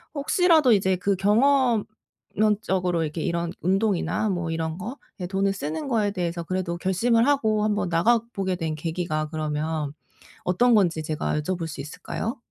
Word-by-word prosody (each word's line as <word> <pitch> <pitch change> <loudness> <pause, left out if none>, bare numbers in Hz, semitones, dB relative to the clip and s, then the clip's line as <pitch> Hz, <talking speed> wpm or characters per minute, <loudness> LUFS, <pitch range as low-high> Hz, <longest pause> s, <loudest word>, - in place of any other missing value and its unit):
혹시라도 310 -2 +4
이제 190 -2 +2
그 195 +2 +1
경험론적으로 215 -5 +1
이렇게 155 +1 -4
이런 170 +1 -1
운동이나 205 +3 +1
뭐 175 -3 -2
이런 160 0 -2
거에 195 -3 -8
돈을 195 0 +1
쓰는 160 - -4
거에 215 -5 +1
대해서 170 -3 -3
그래도 180 -1 -2
결심을 230 +6 +2
하고 220 -7 +2
한번 210 -4 0
나가보게 195 +1 +1
된 160 -2 -2
계기가 155 -1 -2
그러면 155 -1 -2 0.5
어떤 235 +7 +4
건지 170 -6 +2
제가 155 0 -1
여쭤볼 170 +1 -3
수 145 -3 -6
있을까요? 220 - -5
185 Hz, 340 characters per minute, -25 LUFS, 165-215 Hz, 0.5 s, 혹시라도